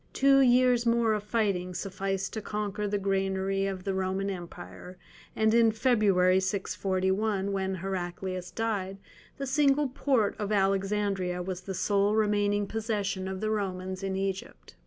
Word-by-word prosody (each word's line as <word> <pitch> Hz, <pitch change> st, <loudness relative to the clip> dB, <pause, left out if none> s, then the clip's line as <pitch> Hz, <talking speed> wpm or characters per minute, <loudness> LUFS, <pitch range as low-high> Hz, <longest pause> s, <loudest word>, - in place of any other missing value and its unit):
Two 275 Hz, 0 st, +5 dB
years 250 Hz, -1 st, +4 dB
more 230 Hz, -1 st, +3 dB
of 210 Hz, -, -1 dB
fighting 200 Hz, -4 st, -1 dB
sufficed 195 Hz, 0 st, -3 dB
to 220 Hz, -, -3 dB
conquer 210 Hz, 0 st, -3 dB
the 205 Hz, 0 st, 0 dB
granary 195 Hz, 0 st, 0 dB
of 190 Hz, -2 st, -4 dB
the 195 Hz, -, -1 dB
Roman 190 Hz, +1 st, -1 dB
Empire; 175 Hz, -, -9 dB, 0.4 s
and 220 Hz, 0 st, +2 dB
in 230 Hz, -1 st, +5 dB
February, 205 Hz, -6 st, +3 dB
641, 190 Hz, +1 st, -1 dB
when 190 Hz, -1 st, -1 dB
Heraclius 185 Hz, 0 st, -4 dB
died, 200 Hz, -4 st, -2 dB, 0.4 s
the 275 Hz, -, -3 dB
single 280 Hz, +1 st, +2 dB
port 250 Hz, -5 st, +1 dB
of 205 Hz, 0 st, -2 dB
Alexandria 195 Hz, -2 st, 0 dB
was 185 Hz, 0 st, -4 dB
the 190 Hz, 0 st, -6 dB
sole 200 Hz, +2 st, +2 dB
remaining 205 Hz, -1 st, +2 dB
possession 205 Hz, -3 st, -2 dB
of 190 Hz, 0 st, -5 dB
the 215 Hz, 0 st, 0 dB
Romans 190 Hz, -2 st, -3 dB
in 195 Hz, -1 st, -2 dB
Egypt. 195 Hz, -, -5 dB
195 Hz, 145 wpm, -28 LUFS, 190-215 Hz, 0.4 s, Two